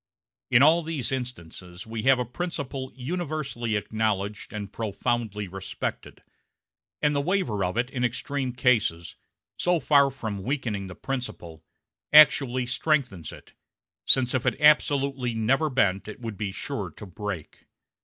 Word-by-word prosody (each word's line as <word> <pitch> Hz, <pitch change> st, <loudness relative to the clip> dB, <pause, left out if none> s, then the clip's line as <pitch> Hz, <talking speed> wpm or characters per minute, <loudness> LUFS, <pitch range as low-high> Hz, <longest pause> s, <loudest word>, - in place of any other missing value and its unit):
In 120 Hz, -, +6 dB
all 160 Hz, +3 st, +6 dB
these 155 Hz, -6 st, -3 dB
instances 90 Hz, -8 st, -6 dB
we 110 Hz, 0 st, -5 dB
have 135 Hz, -, +6 dB
a 125 Hz, -, -1 dB
principle 135 Hz, -2 st, -5 dB
universally 140 Hz, -5 st, -3 dB
acknowledged 105 Hz, -1 st, -2 dB
and 105 Hz, -1 st, -6 dB
profoundly 110 Hz, -1 st, -2 dB
respected; 95 Hz, +1 st, -6 dB, 0.8 s
and 150 Hz, -1 st, +3 dB
the 140 Hz, -, +2 dB
waiver 140 Hz, -, 0 dB
of 90 Hz, +4 st, -2 dB
it 125 Hz, +2 st, 0 dB
in 125 Hz, -3 st, -2 dB
extreme 130 Hz, +2 st, -1 dB
cases, 120 Hz, -9 st, +1 dB, 0.4 s
so 175 Hz, -1 st, +2 dB
far 140 Hz, -2 st, +4 dB
from 110 Hz, -7 st, -5 dB
weakening 110 Hz, -5 st, -2 dB
the 90 Hz, -, -9 dB
principle, 90 Hz, -12 st, -6 dB, 0.5 s
actually 135 Hz, -4 st, +6 dB
strengthens 125 Hz, -, -1 dB
it -, -, -14 dB, 0.5 s
since 130 Hz, -2 st, +4 dB
if 130 Hz, -2 st, 0 dB
it -, -, 0 dB
absolutely 140 Hz, -4 st, +3 dB
never 135 Hz, +8 st, +2 dB
bent 100 Hz, -8 st, +1 dB
it 110 Hz, -, -8 dB
would 115 Hz, -3 st, -5 dB
be 100 Hz, -1 st, -3 dB
sure -, -, -4 dB
to -, -, -11 dB
break. 95 Hz, -3 st, -7 dB
125 Hz, 140 wpm, -26 LUFS, 105-140 Hz, 0.8 s, In